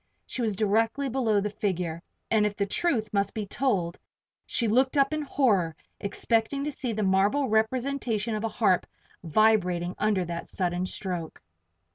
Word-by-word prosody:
She 255 - -5
was 220 -3 0
directly 225 +7 +1
below 230 -5 +2
the 205 +1 -2
figure 180 -5 -2 0.3
and 220 -2 +4
if 210 -1 0
the 200 - 0
truth 220 - 0
must 200 -1 0
be 215 -2 -2
told 195 -7 -1 0.5
she 235 -4 +1
looked 260 +6 +2
up 275 +2 +3
in 310 - -1
horror, 210 - +1 0.2
expecting 225 +6 0
to 300 - -2
see 260 -3 -3
the 215 -1 -1
marble 200 +9 +2
representation 230 0 0
of 215 0 -2
a - - +1
harp 205 -5 +2 0.4
vibrating 180 -1 +2
under 205 -4 +1
that 170 0 -5
sudden 180 -1 -1
stroke! 180 -5 -4
215 Hz, 160 wpm, -27 LUFS, 190-245 Hz, 0.5 s, and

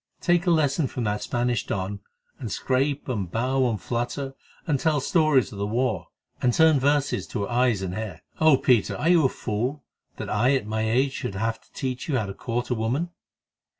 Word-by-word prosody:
Take 175 0 +2
a - - +5
lesson 155 -3 +2
from 125 - -4
that 105 -1 -1
Spanish 120 -2 -1
don, 100 +1 -3 0.4
and 120 -7 -5
scrape 135 +6 0
and 105 -9 -2
bow 130 +5 +1
and 110 -3 -2
flatter 120 +6 -3 0.3
and 150 -6 +1
tell 155 -1 +2
stories 155 -2 +3
of 100 - -8
the 100 - -1
war 110 -5 -1 0.3
and 125 - +3
turn 160 +2 +5
verses 145 +1 +1
to 105 - -3
her 100 - -4
eyes 120 -5 +2
and 90 -1 -3
hair. 110 -1 -5 0.2
Oh, 155 -3 +6
Peter! 125 -5 +2
are 160 - +1
you 175 -3 +5
a - - +4
fool, 125 +8 -3 0.3
that - - -6
I 120 +6 +2
at 130 - -1
my 110 +1 -1
age 130 +4 +2
should 100 - -4
have 115 +2 -2
to - - -28
teach 130 +2 -4
you 135 - +2
how 110 - 0
to 100 - -5
court 120 +3 -3
a - - +4
woman?" 125 +10 -1
125 Hz, 210 wpm, -25 LUFS, 110-140 Hz, 0.4 s, Oh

